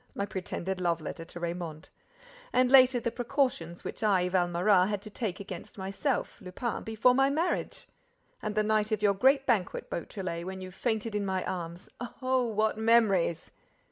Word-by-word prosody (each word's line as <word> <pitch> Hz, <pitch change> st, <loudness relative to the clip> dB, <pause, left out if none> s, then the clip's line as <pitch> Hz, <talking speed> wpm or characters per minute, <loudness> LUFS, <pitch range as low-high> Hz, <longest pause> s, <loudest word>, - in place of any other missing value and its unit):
My 200 Hz, -, -1 dB
pretended 190 Hz, -1 st, -4 dB
love 170 Hz, -2 st, +1 dB
letter 165 Hz, -, -6 dB
to 175 Hz, -, -10 dB
Raymonde! 170 Hz, -2 st, -5 dB, 0.6 s
And, 255 Hz, 0 st, +3 dB
later, 255 Hz, -2 st, +7 dB
the 235 Hz, 0 st, -2 dB
precautions 245 Hz, -, -1 dB
which -, -, -6 dB
I, 190 Hz, -4 st, +3 dB
Valméras, 180 Hz, +1 st, +3 dB
had 205 Hz, -1 st, -1 dB
to 215 Hz, -, -9 dB
take 200 Hz, -4 st, -3 dB
against 195 Hz, -2 st, -8 dB
myself, 195 Hz, +8 st, -2 dB
Lupin, 195 Hz, +5 st, -4 dB
before 225 Hz, +3 st, +3 dB
my 270 Hz, +1 st, +4 dB
marriage! 330 Hz, +5 st, -1 dB, 0.5 s
And 215 Hz, 0 st, -3 dB
the 215 Hz, -, +3 dB
night 215 Hz, 0 st, +1 dB
of 215 Hz, -1 st, -1 dB
your 200 Hz, -1 st, +5 dB
great 270 Hz, +7 st, +3 dB
banquet, 220 Hz, -9 st, 0 dB
Beautrelet, 170 Hz, -1 st, -4 dB
when 190 Hz, 0 st, -5 dB
you 185 Hz, 0 st, -8 dB
fainted 220 Hz, +2 st, -2 dB
in 210 Hz, -1 st, 0 dB
my 190 Hz, -1 st, -1 dB
arms! 170 Hz, -1 st, -5 dB, 0.3 s
Oh, 255 Hz, -1 st, +1 dB
what 215 Hz, 0 st, 0 dB
memories!" 215 Hz, -7 st, +3 dB
205 Hz, 170 wpm, -29 LUFS, 180-235 Hz, 0.6 s, later